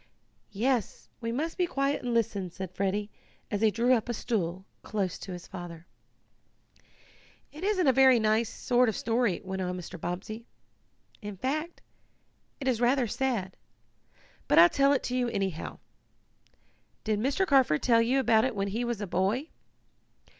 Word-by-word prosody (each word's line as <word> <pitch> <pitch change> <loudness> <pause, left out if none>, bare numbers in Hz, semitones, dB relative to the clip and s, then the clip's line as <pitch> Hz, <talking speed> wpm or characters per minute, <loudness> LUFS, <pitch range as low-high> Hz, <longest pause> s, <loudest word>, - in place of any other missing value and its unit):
"Yes, 240 +1 -1
we 230 -2 -3
must 315 +9 -3
be 360 - +2
quiet 275 -2 0
and 245 - -3
listen," 205 -5 0
said 185 +1 -7
Freddie, 200 +2 -2 0.4
as 205 -1 -1
he 220 - +5
drew 235 +4 +2
up 240 -1 0
a 240 - -1
stool 190 -5 -2 0.2
close 200 -4 -3
to 190 - -8
his 180 -1 -7
father. 175 -3 -9 1.7
"It 310 +4 -10
isn't 390 -3 +1
a 265 - +5
very 260 -1 +6
nice 220 +1 +2
sort 245 0 +2
of 215 - -3
story," 230 -4 0
went 190 0 -4
on 180 0 -2
Mr. 180 -1 -8
Bobbsey. 205 +6 -5 0.7
"In 205 -2 -7
fact 305 - -3 0.8
it 270 - -4
is 245 -3 +1
rather 250 +1 +3
sad. 225 -5 -2 0.9
But - - +3
I'll 170 +1 +9
tell 275 +6 +3
it 280 - +1
to 250 - -2
you, 250 -1 +1
anyhow. 195 -7 -3 1.3
Did 215 -2 0
Mr. 275 - +1
Carford 265 - +3
tell 230 -2 +4
you 250 +4 +2
about 235 -1 +3
when 200 0 -1
he 225 +5 -2
was 235 -3 -3
a - - -2
boy?" 205 - 0
225 Hz, 160 wpm, -29 LUFS, 190-260 Hz, 1.7 s, I'll